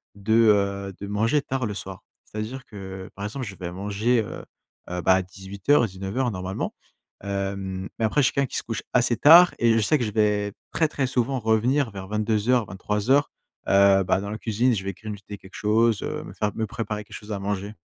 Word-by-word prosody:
de, 100 +2 -1
heu, 100 -3 +3
de 100 - -6
manger 115 +8 +1
tard 135 -3 -2
le 105 - -4
soir. 95 -1 -7 0.2
C'est-à-dire 110 +5 -6
que, 95 -2 -8
par 100 - -5
exemple, 125 +5 -4
je 100 -3 -8
vais 85 0 -6
manger, 105 +5 0
heu - - -8 0.5
heu, 90 0 -3
bah 95 - +5
à 95 - +2
18:00-19:00 100 +4 -1
normalement. 95 0 -4 0.5
Hem, 95 -1 -3
mais 115 - -1
après 110 +7 +1
je - - +3
suis - - -1
quelqu'un 140 -1 +1
qui - - -4
se - - -2
couche 115 -1 -4
assez 120 -1 +3
tard 170 +4 +8
et 115 -1 +4
je - - +3
sais 150 +9 +3
que 125 - -2
je 105 - -3
vais 105 -1 +1 0.2
très, 160 - +2
très 135 -3 -1
souvent 130 +1 0
revenir 120 +5 +2
vers 95 -1 -8
22:00-23:00, 105 +3 +1 0.4
heu, 100 0 +5
bah, 95 +1 +1
dans 100 - -5
la 110 - -4
cuisine, 120 +3 +1
je 95 - -3
vais 95 - -2
grignoter 105 0 -8
quelque 95 0 -15
chose, 110 0 +2
heu, - - -4
me - - -10
faire 105 -1 -1
me 110 - -1
préparer 110 -2 -4
quelque - - -11
chose 105 0 -9
à 100 - -3
manger. 100 +1 -3
105 Hz, 210 wpm, -24 LUFS, 100-115 Hz, 0.5 s, tard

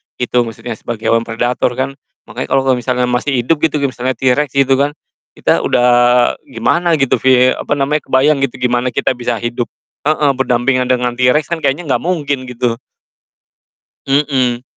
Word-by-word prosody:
gitu, 125 -1 0
maksudnya 115 0 -7
sebagai 115 -2 -3
hewan 115 0 +1
predator 120 +2 -1
kan. 135 +2 -3 0.2
Makanya 120 +3 -6
kalo 135 - +1
kalo 130 -2 +1
misalnya 125 0 -1
masih 130 +3 0
hidup 155 +5 +1
gitu, 155 -1 0
kayak 140 - +1
misalnya 130 +1 -3
T. 115 - -12
rex 145 +3 0
gitu 135 -1 +3
kan, 145 +1 0 0.4
kita - - +1
udah 120 - +1 0.6
gimana 170 -1 +1
gitu, 135 -4 +1
vie 130 -1 +4
apa - - -2
namanya, 145 +2 0
kebayang 140 +3 +3
gitu, 135 -2 -1
gimana 125 0 +1
kita - - +1
bisa 120 -1 -2
hidup 120 0 -2 0.4
heeh, 150 -2 +2
berdampingan 125 0 +1
dengan 125 -1 0
T. 125 - +4
rex 150 -1 0
kan, 170 - 0
kayaknya 140 +3 -1
nggak - - +2
mungkin 145 -7 -1
gitu. 120 -1 -2 1.3
Mhm. 135 -3 +1
130 Hz, 175 wpm, -15 LUFS, 120-140 Hz, 1.3 s, vie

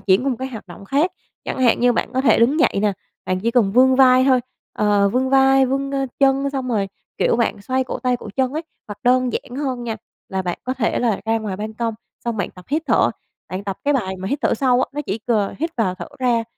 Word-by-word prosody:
chuyển 195 +6 +2
qua 275 - +1
một 250 - -2
cái 260 - -4
hoạt 225 -6 -9
động 185 +2 -11
khác, 290 - +1 0.3
chẳng - - -4
hạn 250 -3 +3
như 245 0 +4
bạn - - -2
có 260 - +1
thể 245 -5 +4
đứng 270 +7 +3
dậy - - +3
nè, 210 -1 +2 0.3
bạn 185 0 -1
chỉ 230 +4 0
cần 230 -5 +2
vươn 260 +3 +5
vai 255 -1 +6
thôi, 260 -2 +4 0.3
ờ, 205 -1 +2
vươn 255 +5 0
vai, 270 0 +5
vươn, 275 +1 -1
ơ, 275 -1 -1
chân 275 0 +3
xong 265 -2 -3
rồi, 205 -4 0 0.3
kiểu, - - +2
bạn 220 -3 -1
xoay 260 +2 0
cổ - - -5
tay, 250 -1 0
cổ 230 - -10
chân 260 -1 +1
ấy. 315 +3 -3 0.3
Hoặc 205 0 -7
đơn 255 0 +3
giản 245 +3 -5
hơn 260 -4 -3
nha, 225 -2 -3 0.3
là 190 0 -2
bạn 175 -1 -3
có 255 +1 -2
thể 235 -4 0
là 230 -4 0
ra 225 0 +1
ngoài 210 -4 -4
ban 215 +1 -5
công 230 -1 -2 0.3
xong 235 -1 -2
bạn 200 - -2
tập 180 - -15
hít 305 +3 0
thở, 235 - +3 0.4
bạn 185 +2 -5
tập 195 -2 -3
cái 290 0 +2
bài 190 -8 -1
mà 190 +1 -5
hít 280 - -1
thở - - +2
sâu 255 -2 +2
á. - - 0
Nó 295 - -2
chỉ 200 +4 -2
c 230 - -8 0.3
hít 325 +4 -1
vào 200 -6 +1
thở 180 -2 -8
ra, 240 -3 +1
245 Hz, 265 wpm, -21 LUFS, 210-265 Hz, 0.4 s, vai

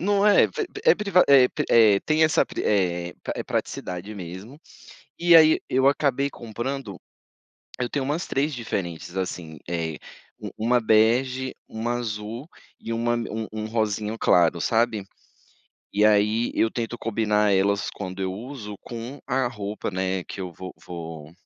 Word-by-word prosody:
Não 200 +2 +2
é? 205 - +6
Pri 435 -4 -3
pri 410 +4 -10
é 480 - +7
priva 200 -3 +3
é 135 -3 +7
pri - - -3
eh, 105 -4 +6
tem 155 +1 +1
essa 155 - +3
pri - - -5
eh 90 -4 0 0.2
eh, - - -2
praticidade 90 +4 -4
mesmo. 95 - -9 0.6
E 170 -1 +6
aí, 155 -1 +6
eu 130 +1 +2
acabei 140 -1 +2
comprando, 120 -2 -5 0.8
eu 125 - -1
tenho 140 +2 -2
umas 150 +6 -2
3 145 +3 0
diferentes 90 -6 -5
assim: 85 -4 -4
eh, 80 -3 -3 0.4
um - - -6
1 120 +3 +2
bege, 125 +4 +2
1 115 +2 -3
azul 115 +4 -5 0.3
e 115 - -5
uma 120 +1 0
um 110 -2 -3
um 110 0 -4
rosinha 110 -1 -1
claro, 85 -1 +3
sabe. 115 -1 +1 0.9
E 105 +1 +2
aí, 105 +2 +3
eu 115 - +2
tento 120 0 -4
combinar 105 -2 +1
elas 100 +1 +2
quando 95 -1 -7
eu 95 -1 -1
uso 110 -1 -7
com 120 +4 -7
a 130 -1 +1
roupa, 105 -3 -4
né, 95 0 -1
que 100 - -8
eu 90 -2 -5
vou 95 +3 -8
vou 80 -3 -8
110 Hz, 160 wpm, -24 LUFS, 95-130 Hz, 0.9 s, é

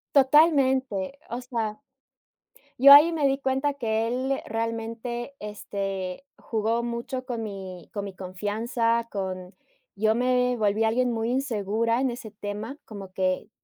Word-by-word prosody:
Totalmente, 265 - +4
o 240 - -3
sea, 230 -2 -3 1.0
yo 280 +2 +10
ahí 310 +4 +8
me 295 -4 +2
di 270 - +1
cuenta 270 +1 0
que 225 -4 -1
él 260 +3 -1
realmente, 230 +3 -4
este, 195 -1 -5
jugó 225 +1 -1
mucho 240 +2 -4
con 235 -3 -3
mi 190 -4 -7
con 205 -1 -4
mi 195 - -8
confianza, 225 +5 -1
con 185 -2 -4 0.4
yo 215 +2 +2
me 250 +1 +2
volví 215 0 +1
alguien 240 +2 +2
muy 225 0 -1
insegura 230 -3 0
en 265 -1 +1
ese 235 -2 -7
tema, 210 +6 -6
como 195 -3 -9
que, 185 +2 -1
230 Hz, 135 wpm, -26 LUFS, 205-255 Hz, 1.0 s, yo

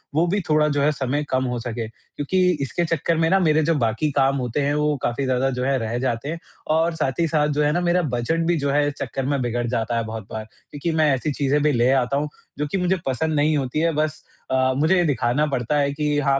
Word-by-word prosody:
वो 165 +3 +3
भी 200 +4 0
थोड़ा 150 0 +4
जो 145 -1 0
है 145 +2 +3
समय 140 0 -1
कम 130 0 +1
हो 120 - -2
सके। 115 -1 -4
क्योंकि 145 +10 -3 0.2
इसके 170 +5 -1
चक्कर 165 0 0
में 165 0 +2
ना, 195 +2 +4
मेरे 155 -3 +3
जो 165 +2 +2
बाकी 120 +3 0
काम 135 0 +2
होते 125 +2 -2
हैं, 140 +1 +1
वो 150 0 +1
काफ़ी 120 +3 -1
ज़्यादा 130 +1 +1
जो 125 -1 -3
है 135 +1 +1
रह 115 +1 -2
जाते 130 +1 -2
हैं, 165 +1 -4 0.3
और 160 +2 +2
साथ 135 -2 -2
ही 165 - +3
साथ 150 -1 +2
जो - - +4
है 150 - +2
ना, 175 - 0
मेरा 175 +1 +2
बजट 125 +7 0
भी 175 -1 +2
जो 140 0 -1
है 145 +1 +2
इस 145 - -2
चक्कर 130 +1 -3
में 140 0 0
बिगड़ 120 0 -1
जाता 115 0 -1
है 115 - 0
बहुत 110 -2 -7
बार, 110 0 -4 0.3
क्योंकि 150 +3 -3
मैं 155 -3 +4
ऐसी 135 +4 -1
चीज़ें 145 +1 +1
भी 150 - +3
ले 120 -1 +2
आता 135 +1 +1
हूँ, 150 +1 -1 0.3
जो 150 - 0
कि - - 0
मुझे 180 0 +1
पसंद 155 +4 -1
नहीं 150 +1 +2
होती 135 +1 -2
हैं, 165 0 +1
बस 155 0 -1 0.3
अ, 130 0 +2
मुझे 160 +6 +3
ये 175 - +3
दिखाना 135 +1 +1
पड़ता 130 -1 -1
है 140 0 +1
कि 150 0 0
हाँ, 135 -1 +2
145 Hz, 265 wpm, -22 LUFS, 130-155 Hz, 0.3 s, थोड़ा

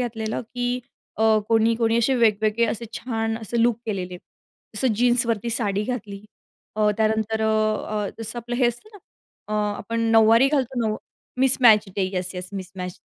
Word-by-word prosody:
घातलेलं, 225 -3 -3
की 245 0 -1 0.4
अ, 220 - -1 0.3
कोणी 225 0 +3
कोणी 230 -1 +2
अशे 240 +3 +2
वेगवेगळे, 220 0 +2
असे 230 +1 -3
छान, 225 -2 -2
असे 230 +1 -1
लूक 235 -1 +3
केलेले. 185 -4 -4 0.6
जसं 240 +1 +1
जीन्सवरती 235 -2 +2
साडी 205 -3 0
घातली. 210 -5 -5 0.5
अ, 210 -1 +3
त्यानंतर 220 0 0
अ, 220 - +2 0.6
अ, - - -4
जसं 225 +1 -4
आपलं 240 +1 -4
हे 250 - +3
असतं 240 - -7
ना, 410 - -13 0.5
अ, - - -4 0.2
आपण 230 +2 -4
नऊवारी 225 +3 +6
घालतो, 265 -3 -1
नऊ 215 - -1 0.4
mismatch 245 -5 +5
day. 190 -2 +1
Yes, 180 +1 -3
yes 180 0 -6
mismatch. 185 -2 -7
225 Hz, 160 wpm, -23 LUFS, 210-240 Hz, 0.6 s, नऊवारी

